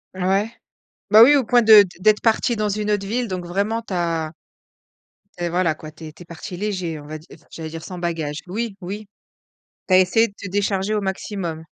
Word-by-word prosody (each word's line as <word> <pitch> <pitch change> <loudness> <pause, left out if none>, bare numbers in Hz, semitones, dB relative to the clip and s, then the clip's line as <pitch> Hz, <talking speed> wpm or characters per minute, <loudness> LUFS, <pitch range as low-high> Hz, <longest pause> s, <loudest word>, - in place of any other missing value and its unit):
Ouais, 195 +4 0 0.6
bah, 215 +1 +9
oui, 290 +4 +7
au 275 - +3
point 245 +1 +4
de 215 -2 +8 0.2
d'être 210 +2 +4
partie 230 +1 +1
dans 215 -1 -1
une 210 +1 -2
autre 205 -1 0
ville 240 +4 -2
donc 185 -3 -5
vraiment 205 +6 -2
tu 210 - -7
as 165 -3 -1 1.1
tu 175 - -5
es, - - -1
voilà 175 -2 +1
quoi, 155 0 -11
tu 160 +1 -12
es 155 - -10
tu 160 - -18
es - - -19
partie 175 +3 -9
léger 185 -5 -3
on 145 - -12
va 155 +1 -6
dire, 155 - -16
j'allais 160 -1 -7
dire, 165 0 -8
sans 180 - -8
bagage, 165 -4 -3
oui, 215 +3 -4
oui. 205 +4 -7 0.8
Tu 185 - +3
as 185 - +8
essayé 225 +5 +3
de - - -18
te 200 - -7
décharger 200 +1 -1
au 210 - 0
maximum. 190 -4 -4
190 Hz, 220 wpm, -21 LUFS, 170-210 Hz, 1.1 s, bah